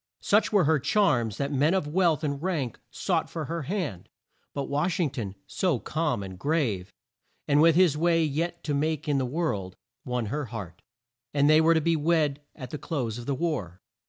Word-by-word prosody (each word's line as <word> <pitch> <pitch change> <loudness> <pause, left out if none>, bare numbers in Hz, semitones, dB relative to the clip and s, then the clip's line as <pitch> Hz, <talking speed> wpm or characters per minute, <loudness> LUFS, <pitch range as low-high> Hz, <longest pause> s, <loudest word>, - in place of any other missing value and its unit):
Such 210 +2 +3
were 205 -4 +4
her 155 0 +3
charms 125 - +2
that 140 0 -2
men 150 +6 +2
of 190 - 0
wealth 165 -1 +2
and 140 -2 -2
rank 160 -9 -2
sought 170 -4 -1
for 160 -2 -4
her 165 +4 -3
hand, 150 - -4 0.4
but 140 - -3
Wash 150 +6 -1
ing 160 -6 +1
ton, 105 -7 -5
so 180 -8 0
calm 150 -4 -1
and 95 -1 -8
grave, 115 - 0 0.6
and 145 0 +4
with 165 0 +6
his 175 -4 +5
way 165 +1 +3
yet 170 +3 -2
to 150 - -2
make 155 +1 -1
in 145 -2 +2
the 130 - -1
world, 120 - -2 0.3
won 125 -2 -2
her 150 -1 -2
heart, 100 -7 -8 0.5
and 140 0 +4
they 155 +1 +6
were 165 +1 +5
to 160 - +3
be 165 +2 +2
wed 150 -2 +1
at 130 -5 -8
the 150 - -5
close 120 -8 -3
of 120 - -9
the 140 - 0
war. 125 - -2
150 Hz, 200 wpm, -27 LUFS, 125-165 Hz, 0.6 s, with